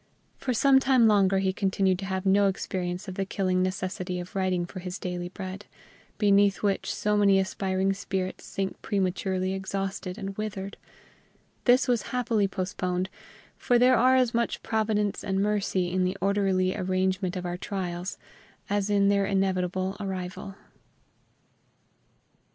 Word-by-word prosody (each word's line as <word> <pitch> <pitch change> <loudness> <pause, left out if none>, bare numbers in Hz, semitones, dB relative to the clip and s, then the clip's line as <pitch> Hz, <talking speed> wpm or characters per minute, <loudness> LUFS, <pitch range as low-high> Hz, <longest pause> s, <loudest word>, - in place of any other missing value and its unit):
For 255 - -2
some 265 +3 +5
time 260 -3 +4
longer 195 -2 +4
he 190 -1 +1
continued 190 -1 +1
to 195 - -4
have 190 0 -3
no 200 +1 +4
experience 185 0 -3
of 190 - -5
the 195 - -2
killing 185 -1 0
necessity 185 -1 -2
of 175 +2 -8
writing 185 -2 0
for 185 +2 -8
his 180 +1 -5
daily 175 -1 -4
bread, 190 +1 -7 0.5
beneath 200 -2 +3
which 200 -1 0
so 210 0 0
many 200 -2 +5
aspiring 190 0 0
spirits 190 -1 -4
sink 195 -1 -4
prematurely 190 -1 -1
exhausted 195 -1 -4
and 195 0 -5
withered; 205 -2 -4 0.9
this 250 +1 +5
was 245 -2 +2
happily 230 -5 +1
postponed, 185 -1 -2 0.5
for 245 - +2
there 250 +1 +5
are 255 +2 +5
as 255 -2 +3
much 235 0 -1
Providence 215 -2 0
and 190 0 -1
mercy 195 -3 0
in 185 0 +1
the 185 +1 -1
orderly 190 -2 +1
arrangement 185 0 0
of 180 -1 -4
our 175 0 -2
trials 180 -1 -4 0.5
as 205 0 +1
in 200 -1 +3
their 200 -1 +3
inevitable 190 -1 0
arrival. 190 -1 -5
195 Hz, 145 wpm, -27 LUFS, 185-205 Hz, 0.9 s, some